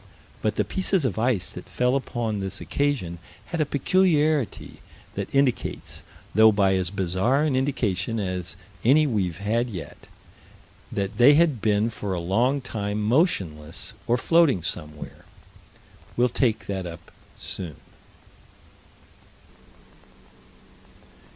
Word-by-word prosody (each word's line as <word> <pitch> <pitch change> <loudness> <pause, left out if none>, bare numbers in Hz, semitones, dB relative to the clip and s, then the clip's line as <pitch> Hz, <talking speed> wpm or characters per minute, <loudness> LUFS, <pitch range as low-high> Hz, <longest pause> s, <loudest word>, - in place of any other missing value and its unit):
But - - 0
the - - +1
pieces 190 -4 +1
of 110 -4 -1
ice 115 -5 +1
that - - -9
fell 125 +1 +1
upon 120 -5 -2
this 95 -1 -4
occasion 130 -13 -1 0.3
had 160 +9 -2
a 150 - +1
peculiarity 155 - +1 0.3
that - - -5
indicates 135 -3 0 0.3
though 110 +2 +7
by 100 -2 +3
as 95 -2 0
bizarre 95 - +1
an 150 -4 +1
indication 115 -6 0
as 90 -4 -3 0.3
any 145 +6 +5
we've 95 - -1
had 115 +5 0
yet 90 -8 -8 0.8
that 100 -1 -3
they 130 +5 +7
had 155 -8 +3
been 105 +1 +2
for 100 -4 -4
a - - -2
long 120 +11 +1
time 105 -4 -3
motionless 100 - 0
or 120 - +3
floating 145 - +3
somewhere. 75 -4 -6 0.9
We'll 125 +1 +4
take 120 -2 0
that 95 -2 -3
up 85 -1 -10 0.3
soon. 85 -6 -5
110 Hz, 120 wpm, -25 LUFS, 95-135 Hz, 0.9 s, though